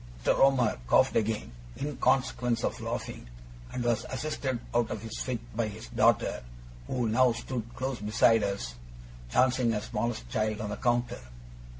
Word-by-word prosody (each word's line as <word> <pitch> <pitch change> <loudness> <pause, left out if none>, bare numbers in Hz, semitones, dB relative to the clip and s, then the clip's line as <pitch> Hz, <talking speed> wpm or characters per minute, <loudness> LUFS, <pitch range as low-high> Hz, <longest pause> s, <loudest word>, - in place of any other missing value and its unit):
Mr. - - +5
Omer 130 - +4
coughed - - +4
again, 110 - 0 0.3
in 145 0 -3
consequence 125 -3 +1
of - - -2
laughing, - - -5 0.4
and 125 - -3
was 120 -2 +1
assisted 130 -2 -2
out 120 -1 +2
of 110 - -4
his 115 -1 -6
fit 125 -2 -2 0.2
by 115 -1 +1
his 110 +2 -8
daughter, - - +2 0.5
who 125 -3 0
now 125 +3 +4
stood 120 0 -4
close 130 -1 -3
beside 110 +2 +4
us, 100 -12 -2 0.6
dancing 125 - +3
her 105 - -1
smallest 110 - -3
child 110 - -1
on 105 -1 -3
the 105 - -4
counter. 120 -1 0
120 Hz, 160 wpm, -29 LUFS, 110-125 Hz, 0.6 s, Mr